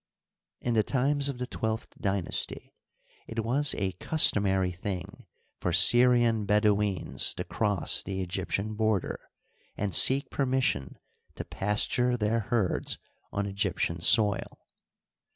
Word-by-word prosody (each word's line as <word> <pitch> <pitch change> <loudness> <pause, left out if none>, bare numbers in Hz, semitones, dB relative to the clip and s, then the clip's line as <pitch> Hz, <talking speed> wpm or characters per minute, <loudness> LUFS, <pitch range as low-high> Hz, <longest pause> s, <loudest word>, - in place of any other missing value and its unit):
In 120 - -2
the 110 - +3
times 140 +5 0
of 135 - -5
the 125 - -4
twelfth 110 -2 -5
d5masty 95 -4 -2 0.6
it 115 -1 -4
was 140 +5 +1
a 95 -1 -2
customary 95 - +2
thing 95 +1 -7 0.3
for 90 - -2
Syrian 120 +3 +4
Bedouins 105 -2 0
to - - -4
cross 100 -5 0
the 95 -1 -6
Egyptian 95 +3 -3
border 110 -3 -1 0.6
and 100 -2 -3
seek 135 +1 +6
permission 130 - -1 0.4
to - - -7
pasture 120 +5 -1
their 110 +1 0
herds 110 -3 -2 0.3
on 100 - -3
Egyptian 95 -4 -2
soil. 105 +2 +2
105 Hz, 115 wpm, -27 LUFS, 95-120 Hz, 0.6 s, seek